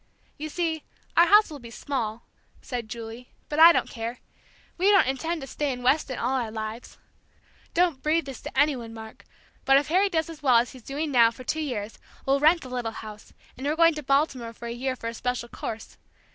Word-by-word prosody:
"You 310 +1 -4
see, 320 -1 -2 0.3
our 340 +1 +6
house 415 -2 +6
will 295 - -7
be 235 -2 -11
small," 230 -2 -4 0.3
said 240 -4 -5
Julie; 230 +2 -8 0.2
"but 300 - -2
I 330 +1 +11
don't - - +1
care 230 0 -5 0.6
we 375 +3 +3
don't 400 -2 +6
intend 320 +5 -2
to - - -5
stay 285 +1 -2
in 250 -1 -6
Weston 265 0 +2
all 250 +3 0
our 235 -3 -2
lives. 220 +2 -6 0.8
Don't 340 -6 +2
breathe 315 +1 +1
this 270 -2 -8
to - - -8
any 290 0 +4
one, 230 -2 -8
Mark, 220 0 -11 0.4
but 270 0 +5
if 285 +1 0
Harry 380 +4 +3
does 320 -4 0
as 325 -2 -10
well 255 -5 +5
as 235 +1 +1
he's 255 - -13
doing 290 +5 -3
now 235 -3 +6
for 235 +2 -11
two 315 +5 -2
years, 225 -7 -4 0.3
we'll 275 +1 +3
rent 315 +4 +5
the 255 - -9
little 245 -2 -2
house, 215 -1 -10 0.2
and 265 +3 -5
we're 300 - +1
going 330 0 +5
to 300 - -5
Baltimore 275 -4 0
for 235 - -10
a - - -4
year 255 +2 -2
for 230 - -7
a 230 - -3
special 250 0 -3
course. 220 -1 -7
265 Hz, 220 wpm, -26 LUFS, 235-310 Hz, 0.8 s, I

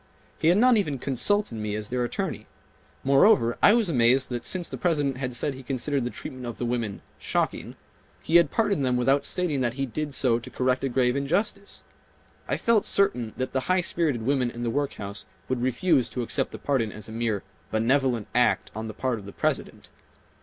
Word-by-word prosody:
He - - +1
had 175 +3 +5
not 245 +1 +5
even 150 -9 -1
consulted 140 - 0
me 105 -1 -3
as 105 0 -4
their 125 0 -1
attorney. 120 - -4 0.6
Moreover, 135 - +4
I 210 - +7
was 230 -4 +2
amazed 130 -3 +3
that 120 -1 -4
since 180 -2 +1
the - - -6
President 145 -6 0
had 130 -2 -3
said 140 +4 0
he 130 - -9
considered 135 0 -1
the - - -1
treatment 125 0 -8
of 120 - -6
the 120 - -3
women 120 -4 -3 0.2
"shocking," - - -2 0.5
he 165 - +5
had 170 -4 +4
pardoned 200 -8 +1
them 125 -1 +1
without 135 +3 +2
stating 165 -7 0
that 120 -2 0
he 135 0 -1
did 145 +3 -4
so 120 -3 +3
to 115 - -10
correct 130 +1 0
a 135 - 0
grave 125 0 +1
injustice. 195 +8 -2 0.6
I - - 0
felt 230 -3 +2
certain 125 - +1
that 130 0 -3
the 130 - +1
high 185 0 +3
spirited 155 -9 -1
women 130 -1 +1
in 120 0 -7
the 115 - -1
workhouse 115 -7 -4 0.2
would 130 -2 -2
refuse 130 +2 +2
to 125 - -3
accept 135 +3 -1
the - - -7
pardon 125 -7 -1
as 105 -1 -8
a - - -9
mere 110 -3 -2 0.3
"benevolent" 120 0 +1
act 125 +1 +2
on 110 +1 -5
the 110 - -7
part 130 -4 -1
of 100 - -12
the - - -7
President. - - -3
130 Hz, 205 wpm, -26 LUFS, 120-150 Hz, 0.6 s, I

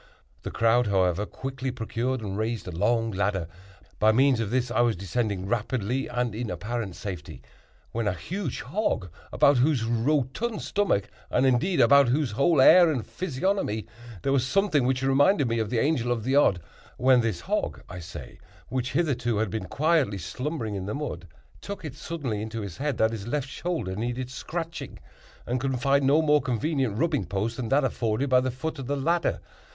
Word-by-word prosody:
The - - -5
crowd, 115 +1 +2
however, 95 0 +1
quickly 135 0 -5
procured 125 +1 -2
and 100 -3 -4
raised 110 0 -2
a - - -4
long 115 +6 +1
ladder. 95 -3 -1 0.5
By 110 +1 +5
means 130 +1 +4
of 110 -3 -1
this 125 +1 0
I 120 - +2
was 120 -2 +2
descending 100 0 -2
rapidly, 120 +3 -1
and 125 -2 -1
in 115 +1 -4
apparent 110 -5 -4
safety, 90 -6 -7 0.5
when 115 -1 -1
a 100 - +1
huge 170 - -4
hog, 135 - -2 0.2
about 140 -1 +4
whose 135 -2 +2
rotund 135 - 0
stomach, 170 - 0 0.2
and 130 - +2
indeed 150 +8 +2
about 140 -1 +6
whose 135 -1 +1
whole 140 +8 +3
air 175 +5 +8
and 130 -7 -2
physiognomy, 175 - -2 0.4
there 135 - +1
was 135 -3 +3
something 145 -2 +2
which 130 0 0
reminded 145 +3 +4
me 115 0 0
of 110 -2 -1
the 120 - -1
Angel 125 -2 +1
of 115 -3 -1
the 130 +3 +1
Odd,—when 125 - +2
this 110 -7 -2
hog, - - -2
I 90 - -8
say, 85 -1 -9 0.3
which 125 0 -2
hitherto 125 -8 0
had 110 -3 0
been 110 -3 -3
quietly 155 -8 +1
slumbering 110 - -4
in 95 -1 -4
the 105 - -3
mud, 130 - -5 0.3
took 200 -4 -7
it 145 - -5
suddenly 140 -8 -4
into 110 +1 -4
his 100 -5 -7
head 145 -2 -2
that 110 0 +3
his 110 -2 -6
left 140 +2 -1
shoulder 160 - -3
needed 120 +4 -3
scratching, 165 +5 -5 0.5
and 125 +1 -1
could 135 -2 -1
find 140 +1 +2
no 150 +4 +4
more 150 -1 +4
convenient 130 -2 -1
rubbing 150 - +1
post 105 +5 -2
than 120 -4 -3
that 140 +2 +3
afforded 125 +1 -1
by 125 - +6
the 130 - -1
foot 145 +5 -5
of 130 - -6
the 145 +1 -1
ladder. 165 +5 0
125 Hz, 185 wpm, -26 LUFS, 110-140 Hz, 0.5 s, air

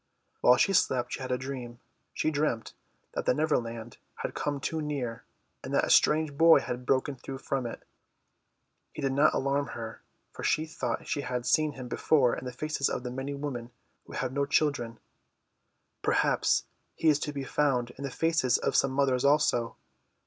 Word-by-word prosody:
While 125 0 +6
she 195 - +3
slept 125 -9 +2
she - - -3
had 130 -1 -4
a 125 - +2
dream. 125 -2 -6 0.3
She 155 - 0
dreamt 145 -7 -1 0.4
that - - -3
the - - +4
Neverland 120 -7 -1 0.2
had - - -4
come 145 -1 -2
too 160 +4 -2
near 130 -6 -4 0.4
and - - -6
that - - +3
a - - 0
strange 155 -1 +4
boy 165 +2 +7
had 125 0 -5
broken 135 +1 +1
through 135 +1 -7
from 130 -2 -2
it. - - -8 1.1
He 150 - -6
did 135 - +1
not 145 +3 +4
alarm 140 +1 0
her, 115 -2 -7 0.3
for - - -9
she 155 - +2
thought 130 -7 -3
she 145 - -1
had 125 -2 -3
seen 155 +3 +2
him 130 -2 -8
before 130 0 +2
in 130 - -7
the 125 - -4
faces 145 +2 -1
of 125 - -3
many 135 +3 -4
women 135 -5 -5 0.4
who - - -11
have 130 -1 -2
no 140 0 0
children. 140 -6 +1 1.0
Perhaps - - +2 0.3
he 165 - 0
is 150 -2 +5
to 150 - -3
be 140 -2 -4
found 135 -4 0
in 135 - -10
the 140 - -2
faces 155 -3 +2
of - - -1
some 135 - +4
mothers 135 -2 +2
also. 140 -5 +2
135 Hz, 185 wpm, -29 LUFS, 125-150 Hz, 1.1 s, boy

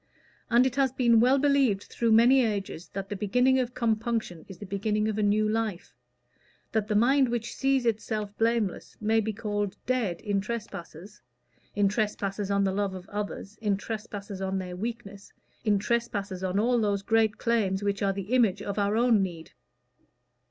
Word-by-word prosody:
And 240 +2 +5
it 260 +1 -1
has 270 -2 +3
been 240 -3 +4
well 255 +4 +5
believed 275 -8 +2
through 230 -1 -1
many 245 +4 +6
ages 200 -6 -3
that 195 0 -5
the 205 - -3
beginning 250 +7 +2
of 250 -1 -2
compunction 225 -6 -1
is 190 - -10
the 205 - -8
beginning 210 +2 -1
of 215 -1 -2
a - - +2
new 210 +1 +2
life; 215 -4 -2 0.8
that 220 -2 0
the 215 - -1
mind 260 +4 +4
which 235 -1 -3
sees 270 -2 +1
itself 215 -2 -2
blameless 225 -4 0
may 220 +1 +2
be 220 0 -1
called 205 -2 -3
dead 235 -9 0
in 205 -2 0
trespasses 205 -3 -7 0.5
in 205 -1 +3
trespasses 205 -1 -2
on 200 0 +2
the 190 -1 +1
love 200 -1 -1
of 185 +1 -9
others, 205 0 -5
in 205 -3 +1
trespasses 205 -2 -6
on 190 0 -1
their 180 -1 -5
weakness, 205 -1 -7 0.3
in 210 -3 +3
trespasses 205 -4 -2
on 185 +1 -1
all 240 +3 +2
those 200 -2 0
great 220 -1 +2
claims 205 -4 0
which 200 -1 -1
are 200 -1 +2
the 195 +4 -5
image 210 -6 +3
of 200 +1 -3
our 205 +2 +1
own 235 -3 +4
need. 170 -4 -5
210 Hz, 180 wpm, -27 LUFS, 200-235 Hz, 0.8 s, many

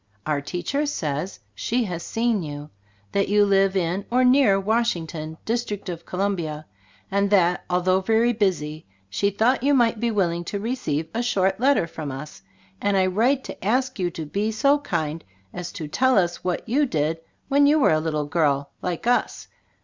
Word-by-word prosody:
Our 150 -2 0
teacher 180 - -2
says 155 - -3
she 240 - -1
has 180 -5 -4
seen 225 +1 0
you. 145 -1 -7 0.4
That 200 -1 0
you 205 0 +4
live 195 -1 +3
in, 185 +1 0
or 250 +2 +3
near 250 -6 +5
Washington, 175 -8 -1
District 220 -4 -2
of 170 -1 -7
Columbia, 175 -6 -2 0.5
and 200 0 +2
that, 180 -3 +3
although 185 +1 +2
very 225 +4 +2
busy, 160 -8 -1 0.2
she 200 - +1
.thought 230 +6 +2
you 285 +2 +3
might 235 -3 +3
be 235 +1 0
willing 175 -5 0
to 200 - -3
re 230 +5 -2
ceive 155 - -2
a 230 - -1
short 195 -5 +1
letter 270 -6 +3
from 155 -3 -6
us, 145 +3 -8 0.4
and 200 -1 +2
I 190 - +4
write 240 +9 +2
to - - -9
ask 255 +3 0
you 180 -1 +1
to 160 -2 -6
be 205 +8 -1
so 280 +7 +3
kind 160 - -3 0.3
as 175 -1 -5
to 155 - -5
tell 260 - +2
us 175 -2 +1
what 180 +3 -2
you 280 +5 +2
did 160 -4 -1 0.3
when 285 +1 +4
you 300 +2 +5
were 270 - +4
a 155 - +2
little 155 -2 -1
girl 145 -3 0
like 180 +1 -3
us. 245 +1 0
195 Hz, 185 wpm, -24 LUFS, 165-235 Hz, 0.5 s, near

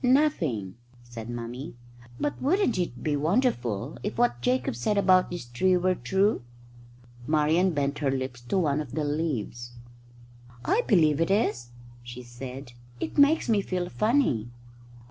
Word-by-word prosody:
"Nothing," 170 - +1 0.3
said 120 -1 -9
Mummy, 120 +4 -6 0.4
"but 290 - -2
wouldn't 295 - +2
it 125 -9 -3
be 150 -2 +1
wonderful 145 - 0
if 210 - -4
what 230 - +1
Jacob 125 -1 0
said 205 - 0
about 185 -2 +4
this 175 -7 -6
tree 180 +10 +2
were 185 +1 +2
true?" 190 - +1 0.9
Marian 155 +4 +3
bent 140 0 -1
her 145 -2 +1
lips 130 -2 -3
to 120 +11 -2
one 150 -5 +1
of 140 -5 -8
the 155 - -1
leaves. 130 -6 -3 0.9
"I 465 - +3
believe 160 - +4
it 165 - +1
is," 155 - +1 0.3
she 120 +1 -9
said. 125 +1 -9 0.3
"It - - -3
makes 290 +3 +5
me 215 -3 +3
feel 180 -2 -3
funny." 215 - +1
150 Hz, 145 wpm, -27 LUFS, 120-190 Hz, 0.9 s, makes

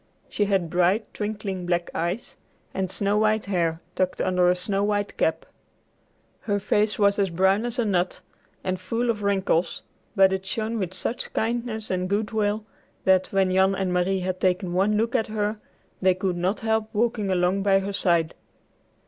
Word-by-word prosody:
She 205 - 0
had 190 -5 0
bright, 180 +5 +1
twinkling 205 -4 -4
black 175 -1 0
eyes, 175 +8 -3 0.4
and 190 -1 -2
snow 200 +2 +1
white 215 0 +2
hair 170 -4 0
tucked 185 -1 -1
under 180 -1 +3
a 180 - +3
snow 195 +2 -1
white 205 -1 -1
cap. 160 0 0 0.9
Her 205 -2 -1
face 210 +1 +1
was 200 -1 +3
as 195 -1 +2
brown 190 +6 +2
as 240 - -4
a 240 - +1
nut 180 -3 0 0.4
and 185 0 -2
full 230 +5 0
of 210 -2 -6
wrinkles, 190 -4 0 0.3
but 190 -1 +5
it 190 0 -2
shone 220 +3 -2
with 185 -2 -3
such 225 +6 -3
kindness 225 -2 -2
and 185 0 -1
good 210 +2 0
will 215 0 0 0.4
that, 190 -1 +4
when 195 -1 +1
Jan 190 +1 +3
and 190 -2 -1
Marie 185 +1 +1
had 185 0 -2
taken 180 -1 0
one 200 +4 +2
look 225 +2 0
at 225 -3 +1
her, 215 0 -2 0.4
they 185 -1 +4
could 185 -1 -1
not 180 +4 -1
help 220 -1 0
walking 220 -2 0
along 185 +1 +1
by 195 -1 +4
her 195 +1 -2
side. 170 -4 +1
195 Hz, 180 wpm, -25 LUFS, 185-210 Hz, 0.9 s, but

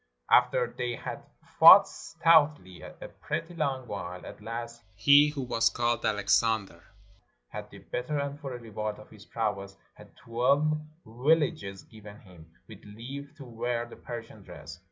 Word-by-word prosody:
After - - +4
they 120 -1 -3
had - - -7 0.4
fought - - +10
stoutly 150 - +1
a - - -10 0.3
pretty 165 +1 -4
long 135 -6 -2
while, 90 -5 -7
at - - -11
last 115 +2 -7
he 145 +7 +6
who 145 -2 -5
was 115 -2 +1
called 120 0 -1
Alexander 105 0 0 0.7
had - - -8
the - - -13
better, 125 +5 -4
and 140 0 -4
for 135 -4 -6
a - - -8
reward 110 -2 -5
of 105 - -15
his 105 -1 -15
prowess 100 -3 -4 0.2
had - - -18
twelve 140 +6 +1 0.3
villages 120 -6 0
given 105 -2 -14
him, 85 -4 -17 0.2
with 110 -3 -13
leave 135 +8 -9
to 140 - -10
wear 120 0 -3
the 120 - -13
Persian 115 -2 -9
dress. 80 +1 -11
115 Hz, 155 wpm, -28 LUFS, 105-140 Hz, 0.7 s, fought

